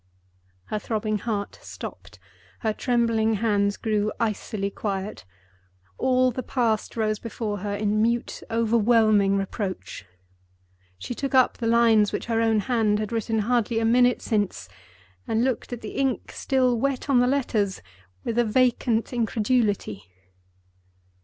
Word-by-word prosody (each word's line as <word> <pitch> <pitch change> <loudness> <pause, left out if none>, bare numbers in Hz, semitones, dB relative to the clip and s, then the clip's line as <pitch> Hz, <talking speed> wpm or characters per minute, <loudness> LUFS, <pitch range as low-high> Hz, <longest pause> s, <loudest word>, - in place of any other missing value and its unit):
_ - - -46 0.7
Her 215 - 0
throbbing 215 0 -2
heart 205 -3 -4
stopped; - - -9 0.4
her 220 -2 0
trembling 230 -2 +1
hands 200 -1 +1
grew 215 -1 0
icily 210 -2 -2
quiet. 195 - -4 0.7
All 255 0 +3
the 255 - -4
Past 230 -3 -1
rose 215 -1 0
before 220 -2 -4
her 205 +1 -3
in 210 +1 0
mute, 235 +2 0
overwhelming 220 -3 +3
reproach. 195 - -4 0.9
She 95 - -5
took 275 +2 -3
up 255 -1 +4
the 230 - -1
lines 225 -3 +4
which - - -3
her 225 -1 0
own 225 -2 +2
hand 215 -1 +1
had 215 0 -3
written 225 -1 -1
hardly 235 -1 +1
a 225 - +1
minute 245 +2 +3
since, 200 - -1 0.6
and 225 +1 +1
looked 255 -2 -1
at 245 - -5
the 215 - -6
ink, 270 -2 -1
still 255 -3 +1
wet 275 +1 -1
on 270 -3 +4
the 245 - +3
letters, 225 -8 0 0.4
with 235 0 -1
a - - +5
vacant 235 0 +1
incredulity. 220 - 0
225 Hz, 140 wpm, -25 LUFS, 210-240 Hz, 0.9 s, a